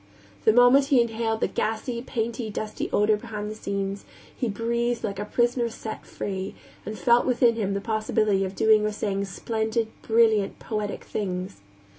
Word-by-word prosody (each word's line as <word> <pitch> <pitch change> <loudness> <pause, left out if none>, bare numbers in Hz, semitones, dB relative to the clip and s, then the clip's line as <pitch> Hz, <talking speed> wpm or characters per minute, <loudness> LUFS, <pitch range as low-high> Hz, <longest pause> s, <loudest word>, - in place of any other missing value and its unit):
The - - +7
moment 245 +4 +6
he 275 -3 +4
inhaled 225 -1 0
the - - +3
gassy, 235 +2 -2
painty, 230 -2 -3
dusty 215 +1 -4
odor 210 +1 +3
behind 210 -1 -5
the - - -6
scenes, 200 -1 -3 0.3
he 245 - -1
breathed 235 +3 -1
like 200 -2 -3
a 205 - -2
prisoner 240 +1 +1
set 220 -1 -7
free, 190 0 -4 0.3
and 215 +1 -4
felt 235 +6 +4
within 240 -2 +3
him 200 -3 -1
the 200 - -2
possibility 215 -2 +1
of 190 0 -4
doing 220 -1 +4
or 215 - 0
saying 200 -1 -1
splendid, 220 +3 -2
brilliant, 220 -3 +3
poetic 210 -2 -4
things. 185 - -4
220 Hz, 165 wpm, -25 LUFS, 205-235 Hz, 0.3 s, The